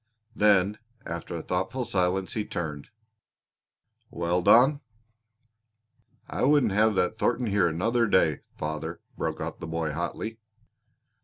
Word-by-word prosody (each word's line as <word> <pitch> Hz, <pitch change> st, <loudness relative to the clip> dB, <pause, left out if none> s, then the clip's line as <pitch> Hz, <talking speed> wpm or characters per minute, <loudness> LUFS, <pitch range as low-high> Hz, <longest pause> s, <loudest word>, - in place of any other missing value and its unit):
Then, 105 Hz, 0 st, +3 dB, 0.3 s
after 85 Hz, +1 st, -5 dB
a 80 Hz, -, -5 dB
thoughtful 95 Hz, +8 st, -2 dB
silence 95 Hz, -2 st, 0 dB
he 110 Hz, -, -1 dB
turned: 75 Hz, -7 st, -5 dB, 1.2 s
"Well, 85 Hz, +1 st, -1 dB
Don?" 135 Hz, +10 st, +5 dB, 1.5 s
"I -, -, -4 dB
wouldn't 140 Hz, -5 st, +4 dB
have 105 Hz, +1 st, +3 dB
that 90 Hz, +3 st, +1 dB
Thornton 120 Hz, 0 st, +1 dB
here 100 Hz, -4 st, +2 dB
another 115 Hz, +9 st, +1 dB
day, 80 Hz, -7 st, +3 dB, 0.2 s
father!" 75 Hz, 0 st, -4 dB, 0.2 s
broke -, -, -3 dB
out -, -, -5 dB
the 80 Hz, -, -6 dB
boy 80 Hz, -1 st, -2 dB
hotly. 85 Hz, +8 st, -4 dB
95 Hz, 125 wpm, -27 LUFS, 85-110 Hz, 1.5 s, Don